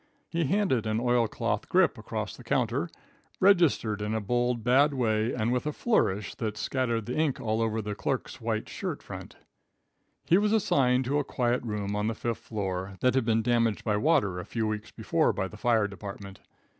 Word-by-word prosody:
He 170 -1 0
handed 135 - +1
an 110 +1 0
oilcloth 120 -2 0
grip - - +4
across - - -5
the - - -13
counter, - - 0 0.5
registered 170 - +3
in 105 +1 -1
a - - +1
bold, 120 +2 0
bad 140 +4 +4
way 110 -2 +1
and 115 +1 0
with 125 +4 -1
a - - 0
flourish 105 - 0
that 110 -2 -4
scattered 115 -1 -1
the 125 - -4
ink 155 -3 +1
all 110 -3 -1
over 110 -1 0
the 105 0 -3
clerk's 130 +3 -3
white 110 -1 -2
shirt - - -5
front. - - -9 0.9
He 175 - +5
was 210 +1 +2
assigned 130 - +3
to 140 +3 +1
a - - 0
quiet 125 -2 0
room 105 -3 -3
on 105 +1 0
the 115 - -1
fifth 115 +1 -3
floor, 95 -2 -4
that 125 - +3
had 130 -3 +1
been 115 -1 +2
damaged 115 -2 +1
by 105 -2 +1
water 105 - +2
a - - -5
few 115 -2 -2
weeks 110 0 -3
before - - +1
by 95 - -2
the 105 - -12
fire 110 -1 +2
department. 100 -1 -9
115 Hz, 195 wpm, -28 LUFS, 105-130 Hz, 0.9 s, He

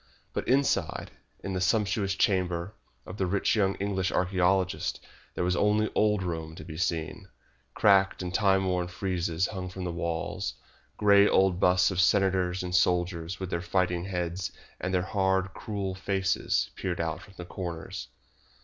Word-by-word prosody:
But - - -3
inside, 130 - +1 0.3
in 95 - -3
the 90 - -2
sumptuous 100 0 +1
chamber 95 -2 0 0.3
of 90 - -8
the 95 - 0
rich 100 +4 +1
young 100 -3 +2
English 95 -2 -1
archaeologist, 90 0 +1 0.4
there - - -1
was 90 0 +1
only 105 +3 +2
old 105 -2 +2
Rome 80 -2 -4
to 95 - -9
be 80 - -8
seen. 80 -2 -2 0.5
Cracked 95 -2 +4
and 90 -1 -4
timeworn 95 -3 +2
friezes 90 -2 -1
hung 95 -3 -5
upon 95 0 -7
the 90 - -2
walls, 85 -7 -3 0.4
grey 100 -1 +6
old 95 -2 +3
busts 90 +1 +4
of 95 -1 +1
senators 95 -2 +2
and 90 0 -4
soldiers 90 0 +1
with 95 -1 -5
their 85 - -1
fighting 90 -1 0
heads 90 -1 -3 0.3
and 90 - -2
their 90 -1 +1
hard, 95 -1 0
cruel 100 -3 -4
faces 95 0 0
peered 90 -2 -3
out 80 -1 -2
from 100 - -16
the 90 - -7
corners. 85 -2 -6
95 Hz, 160 wpm, -28 LUFS, 90-95 Hz, 0.5 s, grey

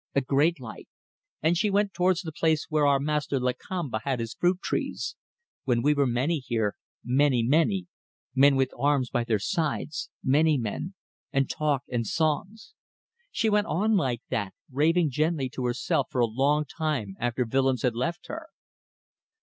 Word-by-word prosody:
A 140 - +4
great 145 +5 +2
light. 125 -3 -9 0.6
And 160 +2 +3
she 210 +5 +1
went 200 0 +1
towards 180 0 +1
the 160 - -5
place 155 0 +1
where 155 -2 +3
our 140 -1 +4
master 150 -1 -1
Lakamba 125 +1 -2
had 135 -3 -1
his 115 -1 -4
fruit 180 +1 +1
trees. - - -3 0.5
When 120 -3 +1
we 150 +2 +4
were 140 -2 +2
many 135 +7 0
here. 115 -5 -1 0.3
Many, 130 -1 +2
many. 165 - +2 0.5
Men 135 +1 +5
with 135 -1 +1
arms 140 -2 +1
by 120 - +1
their 115 -2 +2
side. 155 - -1 0.3
Many... 150 +3 +3
men. 125 - -4 0.4
And 135 0 +1
talk... 145 -3 0
and 115 -3 -2
songs.. 185 - -1 0.3
." 475 +2 -45
She 230 - 0
went 210 -1 +2
on 210 +8 +1
like 130 - 0
that, 100 -4 -2 0.2
raving 155 +3 +2
gently 150 -1 0
to 125 0 -4
herself 120 +1 0
for 125 - -3
a - - +5
long 140 +6 +1
time 140 - -3
after 120 +1 0
Willems 130 0 +1
had 125 -3 +2
left 165 +10 -3
her. 320 0 -7
145 Hz, 170 wpm, -27 LUFS, 125-165 Hz, 0.6 s, Men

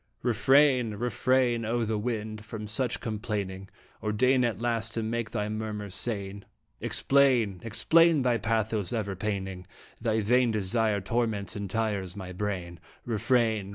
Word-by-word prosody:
Refrain, 125 -1 +4
refrain, 120 +1 +1
O 115 +1 0
wind! 110 -1 -3
from 110 -1 -7
such 120 +3 -1
complaining, 100 -3 -4 0.3
Or 105 - -1
deign 125 +4 +3
at 115 -5 -1
last 115 -1 -2
to 115 - -1
make 115 +1 -2
thy 105 -1 -2
murmurs 105 -2 -4
sane. 100 -2 -2 0.4
Explain, 125 -9 +2
explain 160 +6 +4
thy 120 -2 +2
pathos 110 -3 -1
ever 105 -4 -2
paining 95 -2 -4 0.3
Thy 110 -1 +1
vain 120 +3 +3
desire 110 0 +1
torments 110 -1 -1
and 100 -2 -4
tires 100 -4 -2
my 95 -2 -7
brain. 90 -3 -4 0.3
Refrain 115 -3 +1
110 Hz, 135 wpm, -28 LUFS, 100-120 Hz, 0.4 s, Refrain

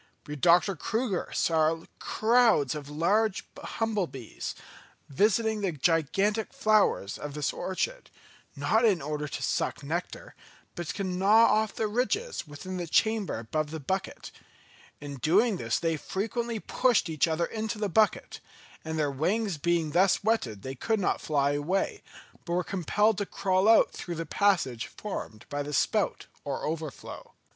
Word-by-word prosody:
But 150 -2 -8
Dr. 180 +3 +5
Crüger 220 - -2
saw 160 0 +2 0.2
crowds 225 - +3
of 145 -2 -7
large 195 +7 +1 0.2
humble 215 -5 -1
bees 130 -7 -7 0.5
visiting 215 - +1
the 190 -4 0
gigantic 170 +8 +1
flowers 215 - +2
of 145 -1 -6
this 150 -1 -1
orchid, - - -3 0.5
not 225 +2 +2
in 205 -7 +4
order 150 +1 -3
to - - -5
suck - - -1
nectar, 175 - -4 0.4
but 175 -2 -6
to 200 - -3
gnaw 195 +5 +4
off 215 -1 +1
the 220 - -1
ridges 255 - -1
within 185 +6 -7
the 175 -1 -4
chamber 220 - +1
above 150 +7 -2
the 160 +1 -5
bucket; 190 +7 -4 0.7
in 145 -1 -7
doing 195 - +3
this 115 -4 -1
they 165 -2 0
frequently 225 +7 -3
pushed 245 -3 +2
each 160 -1 +1
other 165 +1 0
into 220 +2 -4
the 210 -1 -1
bucket, 210 +3 +1 0.4
and 160 0 -4
their 150 -2 +1
wings 185 +5 -1
being 165 0 +1
thus 185 +4 +3
wetted 130 - 0
they 130 - -5
could 220 - -1
not 190 - 0
fly 145 -2 +1
away, 180 - -1 0.4
but 170 - -4
were 180 +1 +1
compelled 200 +5 +1
to 205 - -1
crawl 190 +2 +1
out 225 - +6
through 175 - -6
the 165 0 -4
passage 160 - +1
formed 120 - -7
by 145 0 -3
the 145 +1 -5
spout - - +1 0.2
or - - -3
overflow. 155 -2 -6
180 Hz, 155 wpm, -28 LUFS, 150-215 Hz, 0.7 s, out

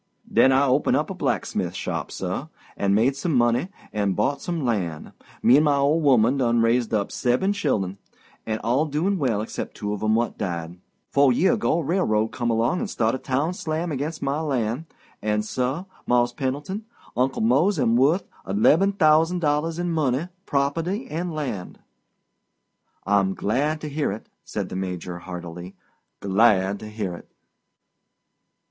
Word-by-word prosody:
"Den 130 - +6
I 135 +2 +4
open 135 +2 +2
a - - +2
blacksmith - - -2
shop, - - -3
suh, - - -4 0.3
and 100 0 +1
made 120 +6 +3
some 155 +2 -1
money 120 +7 +2 0.2
and 100 -3 0
bought 135 +7 0
some 170 -5 -3
lan'. 90 -10 -2 0.3
Me 125 +4 +7
and 150 - +4
my 145 -1 +3
old 145 +4 +2
'oman 125 0 +4
done 120 -3 +2
raised 115 +1 +2
up 105 -2 0
seb'm 135 +11 +1
chillun, 100 - -1 0.4
and 110 -1 -2
all 130 +7 +2
doin' 175 +7 0
well 115 -7 0
'cept - - -6
two 105 0 -3
of 105 - -5
'em 110 0 +2
what 120 +1 -1
died. 85 -3 -4 0.3
Fo' 140 -1 +5
year 170 - +3
ago 220 - +1
a 170 - -1
railroad 110 - +1
come 120 0 -2
along 115 +10 +1
and 230 - -3
staht 115 - +1
a 130 - -2
town 140 +7 -1
slam 165 -1 -3
ag'inst 150 +3 -3
my 140 +3 0
lan', 130 0 -1 0.3
and, 105 0 0
suh, 130 +9 -2 0.2
Mars' 120 0 +3
Pendleton, 145 - -3 0.3
Uncle 130 -1 0
Mose 145 - +3
am 115 -5 +2
worth 145 +10 +3 0.2
leb'm 155 - +4
thousand 160 0 +4
dollars 155 0 0
in 175 0 -1
money, 155 0 0 0.2
property, 165 - 0
and 175 +2 -2
lan'." 130 - -4 1.3
"I'm 100 -1 +2
glad 145 +9 0
to 155 - -4
hear 145 -3 -1
it," 105 - -7 0.2
said - - -4
the - - -6
Major 90 -2 -4
heartily. 90 0 -8 0.5
"Glad 100 -1 +3
to 110 - -8
hear 105 -4 -4
it." 85 - -11
130 Hz, 165 wpm, -24 LUFS, 110-155 Hz, 1.3 s, Me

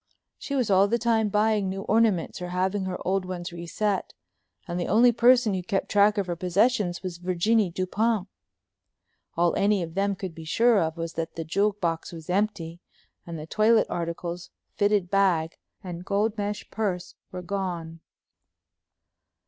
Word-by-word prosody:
She 280 - -4
was 245 -6 +1
all 195 +1 +5
the 235 +3 +1
time 225 -2 +1
buying 210 -1 +1
new 195 +1 -4
ornaments 215 -5 +1
or 180 - -4
having 190 +2 -1
her 185 -1 -3
old 190 +1 +1
ones 180 -1 -5
reset 185 +4 -2 0.5
and 175 0 -3
the 175 - -2
only 235 +5 +5
person 240 -1 +4
who 185 - -1
kept 190 +2 -2
track 205 +1 +4
of 200 - +1
her 175 -1 -3
possessions 185 +1 +1
was 180 -2 -5
Virginie 185 +4 +1
Dupont. 195 +4 -1 1.1
All 170 0 +2
any 200 -2 +2
of 165 -1 -7
them 200 +2 0
could 185 -2 -6
be 165 0 -10
sure 225 +6 +3
of 160 0 -2
was 165 0 -4
that 165 0 -4
the 165 - -4
jewel 200 +6 +1
box 170 -5 -3
was 165 0 -7
empty, 185 -4 -1 0.5
and 170 -1 -5
the 155 - -7
toilet 220 +6 +3
articles, 170 +1 -4 0.2
fitted 205 -3 +1
bag, 180 -5 +2 0.3
and 175 -2 -6
gold 205 +3 0
mesh 205 -1 -4
purse 190 -5 -2 0.2
were 180 -1 -6
gone. 175 -4 -4
190 Hz, 165 wpm, -26 LUFS, 175-210 Hz, 1.1 s, all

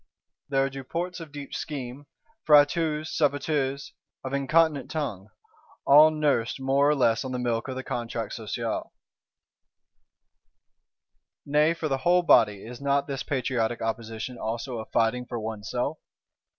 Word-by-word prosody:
There 135 -1 +2
are - - -2
Duports 170 +7 -4
of 165 -3 -9
deep 145 -1 -8
scheme; 140 -1 -6 0.4
Fréteaus, 150 +1 +4
Sabatiers, 140 -2 -1 0.3
of 130 0 -5
incontinent 150 +2 +2
tongue: 120 - -4 0.6
all 150 +3 +8
nursed 145 -6 0
more 135 +2 +2
or 150 - +3
less 120 -3 +2
on 130 - -5
the - - -1
milk 120 -1 -1
of 130 - -4
the 130 - -5
Contrat 115 -3 -4
Social. - - -4 2.5
Nay, 150 +3 +3
for 165 -1 -3
the 135 -2 -1
whole 175 +5 +3
Body, 105 - +4
is 120 +3 -9
not 140 0 +1
this 140 -2 -4
patriotic 125 -4 -1
opposition 115 +2 -4
also 115 +2 -4
a 110 - -6
fighting 120 +2 0
for 120 -1 -4
oneself? 110 +7 -3
135 Hz, 135 wpm, -26 LUFS, 120-150 Hz, 2.5 s, all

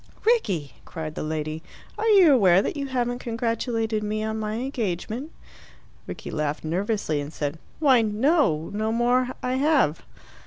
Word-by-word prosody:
"Rickie," 200 - +1
cried 155 -3 -6
the - - -5
lady, 155 0 -3 0.3
"are 440 - -2
you 385 -8 +7
aware 190 -6 +5
that - - -2
you 280 -1 -3
haven't 245 -2 -1
congratulated 230 -2 -1
me 215 +1 -2
on 220 0 -2
my 215 0 -3
engagement?" 235 - -3 0.8
Rickie - - -7
laughed 150 -1 -2
nervously, 175 -2 -1
and 145 +1 -7
said, 150 0 -4 0.2
"Why 270 -6 +5
no! 220 - +1
No 215 +1 -1
more 245 +2 +2 0.2
I 255 +1 0
have." 275 - +2
220 Hz, 150 wpm, -25 LUFS, 165-255 Hz, 0.8 s, you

